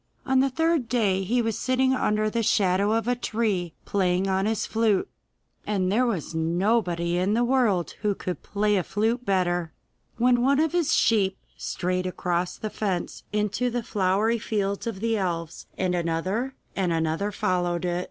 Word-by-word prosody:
On 265 -1 +3
the 270 +1 +3
third 320 -2 +1
day 205 -6 +2
he 240 +5 +1
was 225 -2 -1
sitting 260 +1 +2
under 215 -4 +1
the 230 +2 0
shadow 200 -1 +2
of 225 0 0
a 245 - +2
tree, 210 -8 -1
playing 185 -1 +1
on 190 +1 +1
his 220 -1 0
flute 220 -3 +1 0.6
and 190 -3 0
there 245 +5 +3
was 185 -9 -3
nobody 175 +1 +1
in 195 +4 +1
the 240 - +2
world 235 -9 +2
who 210 -2 +1
could 180 -1 -5
play 210 0 +1
a 185 - +1
flute 225 +7 0
better 175 -4 0 0.4
when 245 +1 +3
one 275 +3 +3
of 320 -1 +2
his 345 -4 +1
sheep 195 -4 +3 0.2
strayed 185 0 -2
across 180 -1 -2
the 215 - -5
fence 190 -5 -3
into 210 +4 0
the 240 0 -2
flowery 210 +4 +1
fields 200 -1 -2
of 205 -4 -4
the 225 0 +1
elves, 170 -4 -3
and 185 -1 0
another 180 +9 -1 0.2
and 185 -3 0
another 165 +5 0
followed 180 -2 0
it. 175 0 0
205 Hz, 170 wpm, -25 LUFS, 180-230 Hz, 0.6 s, On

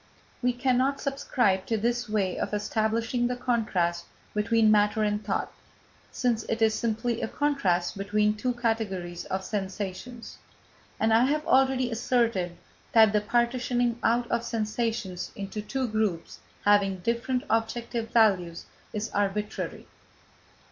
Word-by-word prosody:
We 250 0 +2
cannot 260 +2 +1
subscribe 245 -8 0
to 225 - +1
this 240 +2 -1
way 200 -4 0
of - - -2
establishing 225 +3 0
the 250 - -2
contrast 205 -9 0 0.3
between 220 +1 +3
matter 210 +1 +3
and 210 0 0
thought, - - -2 0.6
since 240 -3 0
it 225 - -2
is 220 -1 +4
simply 230 +1 -1
a - - -1
contrast 220 -13 0
between 210 +1 +2
two 245 +4 -1
categories 200 -7 -2
of 190 0 -3
sensations, 205 +4 -5 0.6
and 220 0 +3
I 230 +3 +5
have 300 +3 0
already 260 -2 +3
asserted 225 -7 0 0.4
that 220 -3 +6
the 210 - +3
partitioning 240 +1 0
out 235 +1 +2
of 235 0 +1
sensations 220 -4 -2
into 200 +1 -5
two 260 +4 -2
groups 215 -6 -2 0.3
having 200 -2 +3
different 235 +4 -1
objective 225 0 -1
values, 190 -8 +2 0.3
is 210 0 -3
arbitrary. 205 +1 -2
225 Hz, 130 wpm, -27 LUFS, 205-240 Hz, 0.6 s, that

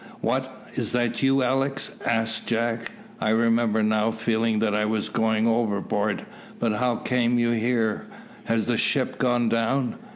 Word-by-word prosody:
"What! - - -2
is - - -2
that 120 -1 0
you, 135 0 +3
Alick?" 135 +2 0 0.2
asked 115 -1 -1
jack. 115 0 -1 0.3
"I 110 - 0
remember 115 -1 +2
now 110 +1 +2
feeling 115 0 0
that 105 -1 +1
I 105 +1 +1
was 105 0 -1
going 110 0 +1
overboard; 105 -2 0 0.3
but 115 -2 +1
how 125 +2 +1
came 120 -1 +1
you 120 0 +2
here? 115 -1 0 0.4
Has 115 -1 0
the 120 -2 0
ship 130 +2 0
gone 120 -2 +2
down?" 115 +3 0
115 Hz, 155 wpm, -25 LUFS, 110-120 Hz, 0.4 s, you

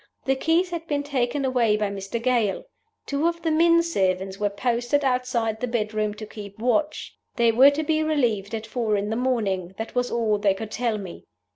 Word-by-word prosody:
The 270 - +3
keys 330 +6 +1
had 335 -1 -5
been 290 -1 -1
taken 275 -1 -1
away 240 -5 +2
by 210 -1 -1
Mr. 195 +3 -4
Gale. 230 -4 +1 0.4
Two 285 +3 0
of 335 -1 -3
the 325 - +1
men 335 +1 +4
servants 190 - -1
were 205 -1 +1
posted 240 +6 0
outside 250 -4 0
the 250 - -2
bedroom 215 -2 -1
to 215 - -7
keep 205 -2 -10
watch. 250 +7 -1 0.2
They 235 -1 +4
were 260 +5 +7
to 290 +2 -2
be 310 0 +1
relieved 235 -10 0
at 220 0 -5
four 220 -2 -1
in 205 +2 -2
the - - 0
morning 205 -8 -1
that 225 - -5
was 245 0 0
all 220 -3 +1
they 200 -1 +2
could 220 +2 -7
tell 235 -2 -1
me. 190 -4 -9
235 Hz, 205 wpm, -24 LUFS, 210-280 Hz, 0.4 s, were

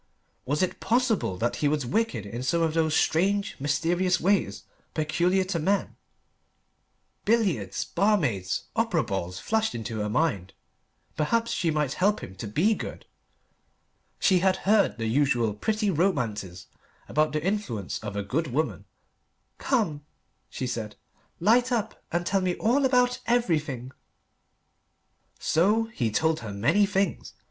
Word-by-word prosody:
Was 145 +6 +1
it 185 - -2
possible 230 - +1
that 120 +5 -1
he 150 - +1
was 145 -2 0
wicked 125 - -1
in 115 +4 -6
some 165 +6 +1
of 160 -1 +1
those 160 -1 +1
strange, 200 +5 +1
mysterious 175 +6 +1
ways 200 +2 +1 0.3
peculiar 170 +5 +1
to 185 -2 -2
men: 195 +6 0 1.3
billiards 180 - +1
barmaids 140 - 0
opera 225 -8 +1
balls 90 -3 -4
flashed 220 - 0
into 110 -1 -4
her 105 0 -1
mind. 105 - -1 0.6
Perhaps 230 +10 0
she 170 - 0
might 150 -3 0
help 205 +3 +1
him 95 - -8
to 105 - -5
be 165 - +2
good. - - -7 1.1
She 185 -2 +3
had 190 +1 +3
heard 205 -5 +3
the 115 - -3
usual 120 -2 +2
pretty 210 - 0
romances 115 - -1 0.4
about 155 +1 +1
the 155 0 -2
influence 180 - -2
of 105 -2 -6
a 100 - -2
good 145 +11 -1
woman. 150 +5 -2 0.7
"Come," 185 - 0 0.5
she 130 - -4
said, 110 -4 -4 0.4
"light 240 +7 +3
up 230 -4 -2
and 175 +1 -1
tell 195 +2 +1
me 180 -1 0
all 260 +5 +2
about 250 -1 +3
everything." 150 - 0 1.5
So 205 +8 +2
he 120 - 0
told 160 +8 +1
her 110 -3 -6
many 145 - +2
things. 195 0 -1
160 Hz, 140 wpm, -26 LUFS, -, 1.5 s, She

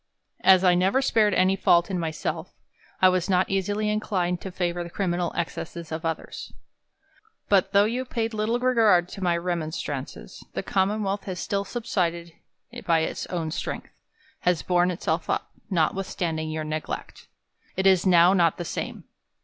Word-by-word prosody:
As 190 -1 +6
I 180 -1 +5
never 185 +8 +3
spared 215 -6 +3
any 190 +1 +3
fault 175 -1 +3
in 180 - -1
myself, 160 +1 -4 0.5
I 185 - +9
was 185 +1 0
not 185 0 +3
easily 205 +2 0
inclined 190 -5 -1
to 190 - -6
favour 175 -1 -2
the 170 - -8
criminal 175 -2 -1
ex 170 - -2
cesses 170 -1 -7
of 160 +1 -4
others. 165 0 -4 1.0
But 195 -3 +3
though 200 +1 +5
you 240 +4 -1
paid 230 -3 -3
little 215 +2 0
regard 225 -8 +4
to 195 - -9
my 175 -2 +2
remon 170 -2 -2
strances, 130 - -6
the - - -3
Commonwealth 200 +1 0
has 185 -3 -5
still 200 -1 -1
subsisted 170 -8 -2 0.5
by 165 -2 +4
its - - -3
own 165 -3 -3
strength; - - -5 0.5
has 180 -2 +1
borne 180 0 +2
itself 165 -2 -2
up, - - -1 0.2
notwithstanding 165 -2 -1
5'our 155 0 -3
neglect. 155 0 -5 0.5
It 190 - 0
is 190 -2 +5
not 180 -1 +6
now 175 -3 +5
the 175 +2 -7
same. - - -5
180 Hz, 165 wpm, -25 LUFS, 170-200 Hz, 1.0 s, I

